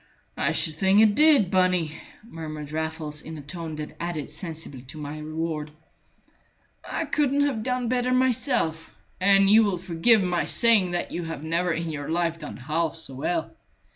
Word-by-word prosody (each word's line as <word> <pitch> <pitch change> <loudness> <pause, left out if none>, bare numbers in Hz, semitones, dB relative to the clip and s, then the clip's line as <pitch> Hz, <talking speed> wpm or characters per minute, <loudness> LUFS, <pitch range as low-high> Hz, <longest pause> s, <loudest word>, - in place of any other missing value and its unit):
"I - - 0
should 160 - +1
think 190 +4 +4
it 215 -1 +5
did, 290 - +5
Bunny," 180 -4 +2 0.3
murmured 155 -8 -8
Raffles, 160 -1 -3
in 160 0 -8
a - - -8
tone 160 +1 -6
that 150 0 -7
added 165 -4 -4
sensibly 160 -5 -7
to 130 +5 -10
my 150 0 -6
reward. 155 0 -4 1.1
"I 330 - -3
couldn't 285 -2 +1
have 260 -6 -1
done 250 +1 -2
better 250 +1 0
myself, 250 - +1 0.3
and 195 +1 +5
you 220 +3 +7
will 200 -4 0
forgive 185 +5 +3
my 180 -1 0
saying 225 -6 +5
that 175 0 -3
you 175 - -4
have 165 -3 -6
never 170 +2 0
in 165 0 -2
your 145 -2 -5
life 165 0 0
done 150 - -8
half 155 +5 -1
so 160 -4 -8
well. 160 +5 -3
170 Hz, 170 wpm, -25 LUFS, 155-205 Hz, 1.1 s, you